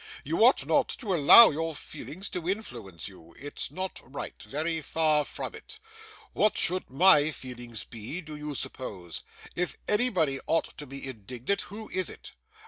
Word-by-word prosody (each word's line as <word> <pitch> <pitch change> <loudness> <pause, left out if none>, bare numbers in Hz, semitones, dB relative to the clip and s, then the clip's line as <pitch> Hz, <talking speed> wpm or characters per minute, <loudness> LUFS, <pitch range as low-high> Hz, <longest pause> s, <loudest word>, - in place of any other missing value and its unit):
You - - +1
ought - - +5
not - - +2
to 210 -7 -2
allow 175 +8 +9
your 160 +1 -3
feelings 185 +7 -7
to 175 -1 -4
influence 115 - -5
you; 85 -4 -15
it's 145 +3 -5
not 185 0 -4
right, 135 +3 -6
very 160 +3 -2
far 155 0 +2
from - - -6
it. 445 0 -11 0.6
What 215 -1 +2
should 185 +2 0
my 150 +1 +6
feelings 120 -5 -7
be, 115 +9 -7
do 155 -2 -9
you 150 -1 -5
suppose? 95 -11 -6 0.3
If 180 0 -2
anybody 185 - +2
ought 165 - 0
to 145 - -6
be 135 +1 -7
indignant, 125 - -3
who 215 +1 -8
is 185 0 -1
it? - - -11
150 Hz, 160 wpm, -28 LUFS, 130-185 Hz, 0.6 s, allow